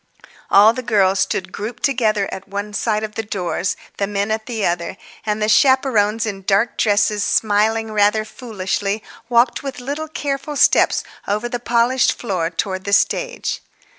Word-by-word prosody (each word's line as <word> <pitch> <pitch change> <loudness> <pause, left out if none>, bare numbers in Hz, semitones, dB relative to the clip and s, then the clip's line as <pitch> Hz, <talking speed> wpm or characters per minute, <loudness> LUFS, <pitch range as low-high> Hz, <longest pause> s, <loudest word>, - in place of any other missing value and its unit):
All 210 +3 +7
the 255 - -4
girls 200 -5 +2
stood 185 0 -1
grouped 220 +4 -6
together 215 -7 +1
at 190 - -7
one 205 +1 -5
side 215 +1 0
of 215 -1 -5
the 225 - -2
doors, 195 -3 -2 0.2
the 200 - 0
men 200 +1 -2
at 220 0 -2
the 225 -4 -2
other, 175 +2 -2 0.3
and 210 0 0
the 215 - 0
chaperones 230 -3 +3
in 200 -3 -4
dark 200 +4 +1
dresses, 205 -1 +2
smiling 220 +1 +1
rather 210 +1 +2
foolishly, 205 -3 -3 0.3
walked 235 0 +3
with 275 -2 -6
little 285 +5 -4
careful 290 -1 -4
steps - - +4 0.2
over 210 +4 -1
the 240 0 -4
polished 240 +1 +2
floor 185 -8 -2
towards 185 +2 -3
the 200 - -2
stage. - - 0
215 Hz, 165 wpm, -19 LUFS, 200-240 Hz, 0.3 s, All